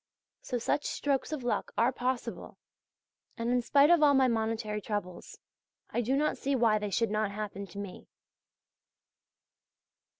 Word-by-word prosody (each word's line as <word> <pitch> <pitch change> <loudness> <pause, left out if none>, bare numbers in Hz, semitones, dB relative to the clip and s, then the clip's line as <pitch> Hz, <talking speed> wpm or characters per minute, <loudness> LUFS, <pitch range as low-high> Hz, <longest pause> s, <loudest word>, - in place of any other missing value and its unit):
So 250 - -3
such 245 +5 -1
strokes 280 0 -1
of 300 -5 -4
luck 240 - -2
are 235 +3 +4
possible, 255 0 -3 0.8
and 230 +1 -1
in 250 0 +2
spite 280 +6 +5
of 345 -2 +5
all 290 -2 +6
my 265 -1 +5
monetary 220 -2 -1
troubles 205 -4 -5 0.5
I 240 - 0
do 250 +4 0
not 300 +2 0
see 275 0 0
why 225 -4 +3
they 210 0 -3
should 225 +2 0
not 215 -1 0
happen 200 -1 -5
to 180 - -13
me. 200 -2 -7
235 Hz, 155 wpm, -30 LUFS, 210-265 Hz, 0.8 s, all